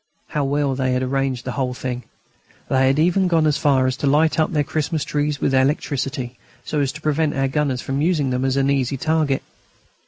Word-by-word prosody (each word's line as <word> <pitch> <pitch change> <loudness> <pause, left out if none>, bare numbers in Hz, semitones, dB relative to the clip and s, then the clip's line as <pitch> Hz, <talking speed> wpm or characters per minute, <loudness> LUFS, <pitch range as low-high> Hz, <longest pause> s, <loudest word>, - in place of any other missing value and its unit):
How 150 - -1
well 140 0 0
they 130 -1 0
had 125 0 0
arranged 135 -1 -1
the 125 - -2
whole 125 -1 -2
thing! 125 -1 -4 0.6
They 130 0 +3
had 135 +2 +2
even 180 +4 +3
gone 165 -3 +3
as 150 -2 +2
far 135 -3 +3
as 130 0 0
to 145 - -1
light 155 +3 +3
up 155 - +2
their 150 -2 +1
Christmas 155 0 -2
trees 145 -1 -1
with 135 - 0
electricity, 135 -2 -1 0.3
so 150 - -1
as 140 -2 +1
to 150 - -10
prevent 155 0 0
our 135 0 +1
gunners 135 -2 -1
from 135 +1 -2
using 155 -5 +1
them 125 +1 -1
as 135 0 +1
an 135 0 +2
easy 135 0 0
target. 155 -2 0
140 Hz, 215 wpm, -21 LUFS, 130-150 Hz, 0.6 s, They